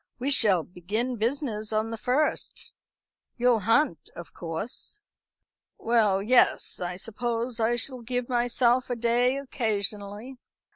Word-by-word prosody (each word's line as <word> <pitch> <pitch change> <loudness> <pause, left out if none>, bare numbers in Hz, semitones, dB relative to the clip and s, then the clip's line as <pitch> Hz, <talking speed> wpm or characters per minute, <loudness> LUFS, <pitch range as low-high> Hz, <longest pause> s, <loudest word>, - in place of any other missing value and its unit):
"We 265 +3 -2
shall 200 - +4
begin 215 +9 -3
business 225 -2 -2
on 220 +1 0
the - - -2
first. 260 +7 -1 0.6
You'll 245 -2 +3
hunt, 225 - +1
of 170 - -10
course?" 175 - -5 0.8
"Well, 215 -4 +2
yes; 245 +3 +3
I 180 0 -3
suppose 230 +3 -3
I 230 +1 +2
shall 250 +1 -1
give 245 +1 -2
myself 245 0 +2
a 245 - -1
day 240 +3 +2
occasionally." 215 -2 -3
235 Hz, 125 wpm, -26 LUFS, 210-250 Hz, 0.8 s, shall